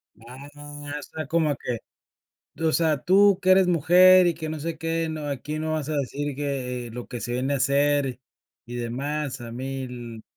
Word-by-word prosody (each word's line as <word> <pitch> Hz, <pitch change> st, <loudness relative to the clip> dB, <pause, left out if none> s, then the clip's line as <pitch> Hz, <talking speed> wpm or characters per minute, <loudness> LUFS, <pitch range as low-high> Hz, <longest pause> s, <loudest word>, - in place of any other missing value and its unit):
Ah, 125 Hz, +6 st, -12 dB, 0.5 s
o -, -, -9 dB
sea, 155 Hz, -3 st, -7 dB
como 155 Hz, -2 st, +1 dB
que 120 Hz, -1 st, -4 dB, 0.8 s
t 165 Hz, -, -5 dB
o 160 Hz, -, +3 dB
sea, 160 Hz, -3 st, +2 dB
tú 195 Hz, +2 st, +5 dB
que 185 Hz, -, +2 dB
eres 185 Hz, 0 st, +6 dB
mujer 180 Hz, +3 st, +6 dB
y 170 Hz, -, +2 dB
que 160 Hz, 0 st, -6 dB
no 155 Hz, -1 st, -4 dB
sé 165 Hz, +2 st, -4 dB
qué, 165 Hz, +1 st, -1 dB
no, 155 Hz, -1 st, -5 dB
aquí 145 Hz, +3 st, -4 dB
no 155 Hz, 0 st, -2 dB
vas 155 Hz, -2 st, -2 dB
a 155 Hz, -, -1 dB
decir, 145 Hz, +1 st, -2 dB
que, 125 Hz, -4 st, -3 dB
eh, -, -, -9 dB
lo 120 Hz, +1 st, -7 dB
que 120 Hz, -2 st, -7 dB
se 120 Hz, -, -4 dB
viene 130 Hz, +3 st, 0 dB
a -, -, +1 dB
hacer 140 Hz, -1 st, +1 dB, 0.5 s
y 120 Hz, -, -8 dB
demás, 135 Hz, +3 st, -3 dB
a 120 Hz, -1 st, -7 dB
mil 125 Hz, -2 st, -6 dB
145 Hz, 205 wpm, -25 LUFS, 125-160 Hz, 0.8 s, eres